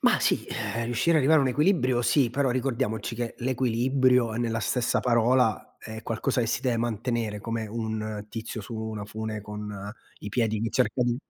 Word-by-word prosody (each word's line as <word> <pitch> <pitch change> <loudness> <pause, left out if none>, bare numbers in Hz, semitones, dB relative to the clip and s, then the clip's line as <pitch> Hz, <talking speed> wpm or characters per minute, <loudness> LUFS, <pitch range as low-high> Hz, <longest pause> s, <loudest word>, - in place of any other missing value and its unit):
Ma - - +4
sì, - - +2
eh, 110 +2 -3
riuscire 120 +8 +1
ad 160 - +5
arrivare 150 +2 +5
a - - +2
un 130 - +2
equilibrio, 130 -4 +2
sì, 130 -1 +3
però 135 +1 +1
ricordiamoci 120 -3 -1
che 120 0 -3
l'equilibrio 125 0 +2
è 110 - -3
nella 115 -2 -1
stessa 120 +3 +1
parola, 120 -2 +2
è 110 +1 -8
qualcosa 125 +3 0
che 115 - +1
si 120 - 0
deve 125 -3 +1
mantenere, 115 -2 -2
come 115 0 -3
un 110 -1 -4
tizio 110 +1 -5
su 115 +3 -8
una 110 -1 -4
fune 110 +1 -5
con 105 -1 -6 0.3
i 105 - -5
piedi 110 -1 0
che 115 0 -1
cerca 125 0 +1
di 120 0 +1
115 Hz, 190 wpm, -27 LUFS, 110-125 Hz, 0.3 s, ad